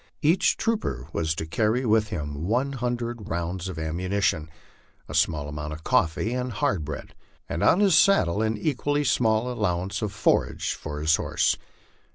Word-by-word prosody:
Each 160 Hz, +5 st, +3 dB
trooper 225 Hz, -1 st, -1 dB
was 80 Hz, -1 st, 0 dB
to 80 Hz, -, -3 dB
cany 110 Hz, +9 st, 0 dB
with 110 Hz, -1 st, +3 dB
him 75 Hz, -3 st, -4 dB
one 130 Hz, +6 st, +1 dB
hundred 120 Hz, -3 st, -3 dB
rounds 85 Hz, +2 st, -3 dB
of 90 Hz, -, -6 dB
ammunition, 85 Hz, 0 st, -1 dB, 0.6 s
a -, -, -8 dB
small 75 Hz, -3 st, +1 dB
amount 75 Hz, +1 st, -5 dB
of 80 Hz, +1 st, -9 dB
coffee 85 Hz, +8 st, +1 dB
and 125 Hz, 0 st, -2 dB
hard 100 Hz, -5 st, 0 dB
bread, 75 Hz, 0 st, -7 dB, 0.3 s
and -, -, -3 dB
on 190 Hz, -, +4 dB
his 195 Hz, -5 st, +5 dB
saddle 105 Hz, -, +4 dB
an 110 Hz, 0 st, 0 dB
equally 145 Hz, +3 st, 0 dB
small 120 Hz, -2 st, +2 dB
allowance 100 Hz, -2 st, -1 dB
of 105 Hz, -2 st, -2 dB
forage 105 Hz, +1 st, +1 dB
for 75 Hz, -1 st, -6 dB
his 80 Hz, +1 st, +3 dB
horse. -, -, +1 dB
105 Hz, 165 wpm, -25 LUFS, 80-120 Hz, 0.6 s, his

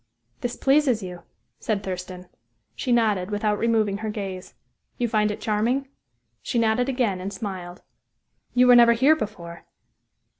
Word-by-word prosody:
"This 245 Hz, 0 st, -3 dB
pleases 270 Hz, -6 st, +2 dB
you," 180 Hz, -2 st, -8 dB, 0.4 s
said 205 Hz, -3 st, -2 dB
Thurston. 180 Hz, -1 st, -6 dB, 0.5 s
She 255 Hz, -, -3 dB
nodded, 210 Hz, -6 st, +2 dB
without 210 Hz, 0 st, -1 dB
removing 220 Hz, -3 st, +1 dB
her 220 Hz, 0 st, -4 dB
gaze. 195 Hz, -3 st, -6 dB, 0.4 s
"You 240 Hz, -, 0 dB
find 215 Hz, -1 st, +1 dB
it 210 Hz, -, -4 dB
charming?" 235 Hz, +6 st, 0 dB, 0.5 s
She -, -, -3 dB
nodded 230 Hz, +3 st, +2 dB
again, 235 Hz, -8 st, 0 dB
and 195 Hz, +2 st, -4 dB
smiled. 185 Hz, -3 st, -7 dB, 0.7 s
"You 250 Hz, 0 st, +5 dB
were 250 Hz, 0 st, +7 dB
never 235 Hz, -1 st, +7 dB
here 270 Hz, +7 st, +4 dB
before?" 175 Hz, -, -7 dB
215 Hz, 145 wpm, -24 LUFS, 190-240 Hz, 0.7 s, were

